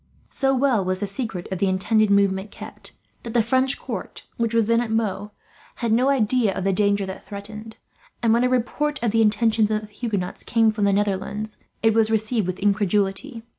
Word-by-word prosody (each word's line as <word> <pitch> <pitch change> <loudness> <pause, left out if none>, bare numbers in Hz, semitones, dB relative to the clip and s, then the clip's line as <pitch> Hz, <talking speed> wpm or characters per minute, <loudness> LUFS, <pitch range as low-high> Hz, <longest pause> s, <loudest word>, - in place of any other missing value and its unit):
So 270 -1 +1
well 255 -6 +2
was 185 0 -2
the 205 - -1
secret 200 -3 -5
of 190 - -3
the 195 - +2
intended 215 +3 +2
movement 200 0 +2
kept - - -10 0.3
that 235 0 -8
the 235 - +4
French 260 +3 +2
court, - - -7
which 230 -1 -1
was 230 -2 +2
at 230 0 +2
Meaux, 210 -3 -1 0.5
had 235 -2 -2
no 250 +4 +3
idea 240 -5 +2
of 190 - -3
the 195 0 +1
danger 200 0 +1
that 190 0 -8
threatened; 215 +2 -9 0.5
and 225 -1 +4
when 235 +1 +3
a 250 - +3
report 290 +4 0
of 230 - +2
the 225 +1 +3
intentions 220 0 +3
of 215 0 0
the 210 -1 -13
Huguenots 205 -5 -3
came 225 -1 +3
from 210 -1 -1
the 200 - +3
Netherlands, 205 +1 -2 0.3
it 225 -1 +4
was 220 0 +3
received 220 -2 +1
with 185 0 -3
incredulity. 205 +4 0
215 Hz, 200 wpm, -23 LUFS, 200-230 Hz, 0.5 s, the